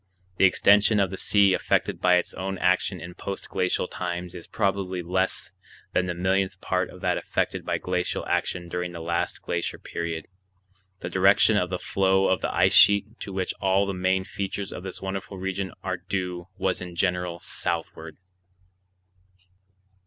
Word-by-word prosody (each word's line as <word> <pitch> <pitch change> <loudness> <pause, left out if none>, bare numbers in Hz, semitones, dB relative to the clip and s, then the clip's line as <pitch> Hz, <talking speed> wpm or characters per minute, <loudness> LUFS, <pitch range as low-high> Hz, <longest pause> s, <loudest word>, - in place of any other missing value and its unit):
The - - +6
extension 105 +3 +5
of 95 -2 +2
the - - -3
sea 100 -1 +4
affected - - 0
by 90 -1 +5
its 90 - 0
own 95 +1 -4
action 90 +1 +1
in 85 +1 -8
post 100 +2 -6
glacial 90 0 0
times 90 -1 -4
is 85 -2 -9
probably 95 -3 -1
less 95 +2 -1 0.4
than 90 - +1
the 90 - -2
millionth 95 +2 0
part - - -1
of - - -13
that - - +1
affected - - -2
by - - -1
glacial 90 -1 -2
action 90 -1 -1
during 90 0 -3
the 85 - -6
last 85 +1 -2
glacier 85 0 -2
period. 85 -1 -5 0.7
The 90 - -4
direction 95 +4 +5
of 90 -3 +1
the 90 - -2
flow 95 +1 +2
of - - +1
the - - -1
ice - - +3
sheet 100 +3 +5
to 100 - -6
which 95 -1 -2
all 95 +1 +3
the 100 - -2
main 95 +1 +1
features 100 +1 -4
of - - -6
this 95 0 -7
wonderful 95 0 -4
region 95 0 -3
are - - -2
due 90 -2 -4
was 95 -1 0
in 90 -1 -7
general 90 -1 0
southward. 80 -1 -3
95 Hz, 170 wpm, -26 LUFS, 90-95 Hz, 0.7 s, The